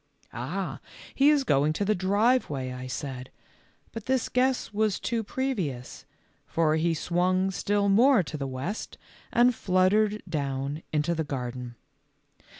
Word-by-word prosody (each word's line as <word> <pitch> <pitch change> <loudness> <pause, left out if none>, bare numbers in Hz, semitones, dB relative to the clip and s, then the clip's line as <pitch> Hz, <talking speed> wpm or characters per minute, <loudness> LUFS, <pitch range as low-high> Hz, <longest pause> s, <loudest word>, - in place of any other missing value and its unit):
"Ah, 165 +11 -4 0.3
he 275 +2 +5
is 295 -2 +4
going 145 - +2
to 200 - -1
the 215 - +3
driveway," 190 - +1
I 125 0 -6
said, 130 -1 -5 0.6
but 225 -2 -8
this 260 -2 +1
guess 255 -3 +1
was 215 -1 +1
too 230 -1 -1
previous, 195 - -3 0.4
for 160 -2 +2
he 165 +1 +1
swung 185 +3 +1
still 200 +2 0
more 230 +2 +5
to 155 - -7
the 140 -2 -3
west 135 - -5 0.3
and 245 +1 +4
fluttered 205 +2 +2
down 140 -2 -3
into 155 +2 +1
the 160 -1 -1
garden. 125 -3 -5
180 Hz, 140 wpm, -27 LUFS, 140-215 Hz, 0.6 s, he